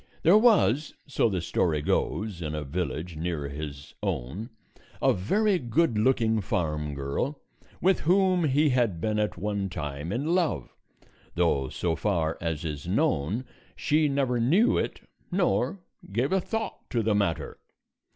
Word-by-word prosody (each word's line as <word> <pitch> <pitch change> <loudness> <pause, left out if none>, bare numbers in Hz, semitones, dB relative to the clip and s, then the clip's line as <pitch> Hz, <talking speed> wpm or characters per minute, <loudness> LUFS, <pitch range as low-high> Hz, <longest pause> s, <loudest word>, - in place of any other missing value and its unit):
There 170 +5 +6
was, 200 - +4
so 135 -4 +1
the 95 -4 -1
story 80 -3 0
goes, 105 +1 -1
in 75 -1 -3
a 75 - -3
village 85 +2 -4
near 80 -3 -2
his 70 -1 -7
own 90 - -3 0.5
a - - +4
very 195 - +1
good 125 +1 +1
looking 110 -1 +2
farm 75 -5 -2
girl 70 - -2 0.4
with 190 0 +3
whom 185 0 +3
he 150 +2 +3
had 120 -9 +1
been 105 +4 0
at 105 -3 -1
one 100 +1 -2
time 75 -2 -5
in 140 +10 0
love, 170 - 0 0.6
though 75 -7 +1
so 85 -2 -1
far 80 -6 0
as 80 -1 -2
is 75 0 -5
known, 110 - 0 0.3
she 150 0 +2
never 135 -3 +1
knew 170 - +4
it - - -2 0.3
nor 175 -3 +1 0.3
gave 120 +8 0
a 190 0 +2
thought 220 +4 -4
to 115 -3 0
the 110 0 +2
matter. 100 -6 -1
105 Hz, 150 wpm, -27 LUFS, -, 0.6 s, There